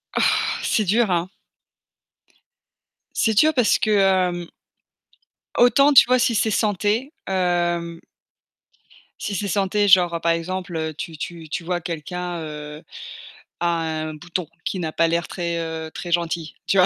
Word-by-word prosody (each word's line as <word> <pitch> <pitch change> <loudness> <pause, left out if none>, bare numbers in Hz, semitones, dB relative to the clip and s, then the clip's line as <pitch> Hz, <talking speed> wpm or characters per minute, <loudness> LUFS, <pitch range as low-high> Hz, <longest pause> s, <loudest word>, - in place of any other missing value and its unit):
Oh! - - +2 0.4
C'est 215 - +1
dur, 220 +3 +2
hein? 175 +1 0 1.9
C'est 220 - +2
dur 310 +7 +5
parce 250 -6 +3
que, 215 - 0
hem 185 -3 +2 1.1
autant, 275 +4 +5
tu 265 - +9
vois, 255 0 +3
si 235 -1 +2
c'est 220 +1 +2
santé, 215 - 0
hem 175 -2 0 1.2
si 200 - -3
c'est 200 +2 -2
santé, 200 +1 +1
genre, 175 -3 +5
par 170 - +2
exemple, 180 +2 -3
heu, 160 0 -3
tu 160 +1 -7
tu 165 0 -7
tu 170 - -3
vois 175 +1 -2
quelqu'un, 175 +2 -5
heu, 150 -1 -8 0.8
a 175 - 0
un 160 -2 -2
bouton 170 +2 -5 0.2
qui 190 - -2
n'a 160 -3 -3
pas 165 - +2
l'air 170 0 0
très, 170 -2 -3
heu, 160 -1 -5
très 175 - -6
gentil, 170 -2 -1
tu 195 - +2
vois? 185 - +7
175 Hz, 150 wpm, -22 LUFS, 165-200 Hz, 1.9 s, tu